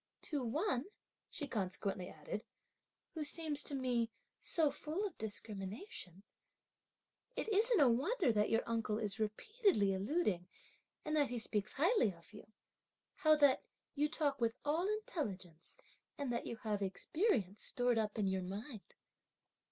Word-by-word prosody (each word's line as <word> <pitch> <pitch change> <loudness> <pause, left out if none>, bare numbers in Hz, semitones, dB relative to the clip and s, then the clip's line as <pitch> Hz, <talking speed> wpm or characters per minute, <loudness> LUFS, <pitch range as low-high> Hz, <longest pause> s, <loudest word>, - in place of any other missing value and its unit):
To 290 -4 -2
one," 260 - 0 0.4
she 290 - -4
consequently 195 -4 -2
added, 155 +8 -5 0.7
"who 315 - -2
seems 300 -1 +1
to 285 - -3
me 245 -3 +1 0.3
so 315 -4 +2
full 320 +10 -3
of 400 - -4
discrimination, 205 - -6 1.1
it - - -2
isn't 440 +2 +4
a 285 - +7
wonder 280 - +3
that 210 -1 +2
your 225 - +3
uncle 225 -2 0
is 215 -1 -2
repeatedly 220 - +2
alluding, 195 - 0 0.6
and 305 0 0
that 290 -2 +3
he 245 - -2
speaks 215 -2 -1
highly 310 - +4
of 170 +4 -17
you; 210 - -11 0.7
how 310 -1 +6
that 285 -3 +5 0.3
you 300 +1 +1
talk 290 -4 0
with 230 0 +2
all 320 +6 +2
intelligence 195 - -4 0.4
and 275 -4 -1
that 235 - -2
you - - -3
have 215 -2 -2
experience 205 - 0
stored 245 -2 +1
up 215 -1 -1
in 210 - +2
your 190 -1 +1
mind." 205 +5 -7
240 Hz, 145 wpm, -37 LUFS, 205-305 Hz, 1.1 s, a